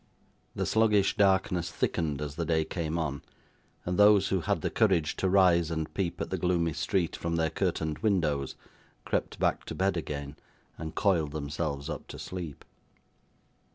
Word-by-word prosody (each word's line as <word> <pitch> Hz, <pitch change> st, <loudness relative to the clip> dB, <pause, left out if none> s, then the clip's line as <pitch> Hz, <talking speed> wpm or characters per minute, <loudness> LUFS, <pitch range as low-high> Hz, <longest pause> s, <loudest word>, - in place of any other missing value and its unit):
The -, -, -1 dB
sluggish 105 Hz, -3 st, +3 dB
darkness 95 Hz, -3 st, +2 dB
thickened 75 Hz, -3 st, -1 dB
as 75 Hz, -1 st, -5 dB
the 85 Hz, -, -3 dB
day 80 Hz, -1 st, +1 dB
came 80 Hz, 0 st, -3 dB
on; 75 Hz, -4 st, -2 dB, 0.6 s
and 90 Hz, +2 st, -1 dB
those 105 Hz, -2 st, +6 dB
who 95 Hz, -2 st, +1 dB
had -, -, 0 dB
the -, -, -1 dB
courage 90 Hz, -8 st, +2 dB
to 95 Hz, -, +1 dB
rise 90 Hz, -4 st, +4 dB
and 80 Hz, -1 st, -3 dB
peep 90 Hz, -3 st, -2 dB
at -, -, -4 dB
the 95 Hz, -, -1 dB
gloomy 85 Hz, -2 st, +1 dB
street 90 Hz, +3 st, 0 dB
from 85 Hz, 0 st, -2 dB
their 80 Hz, -1 st, +1 dB
curtained 80 Hz, -1 st, -1 dB
windows, 85 Hz, -, 0 dB, 0.5 s
crept -, -, -1 dB
back -, -, +1 dB
to -, -, -6 dB
bed 95 Hz, 0 st, +1 dB
again, 70 Hz, -3 st, -5 dB, 0.4 s
and 80 Hz, 0 st, -7 dB
coiled 85 Hz, -8 st, +1 dB
themselves 70 Hz, -1 st, -3 dB
up -, -, -6 dB
to -, -, -9 dB
sleep. 85 Hz, -5 st, -7 dB
85 Hz, 165 wpm, -29 LUFS, 75-95 Hz, 0.6 s, those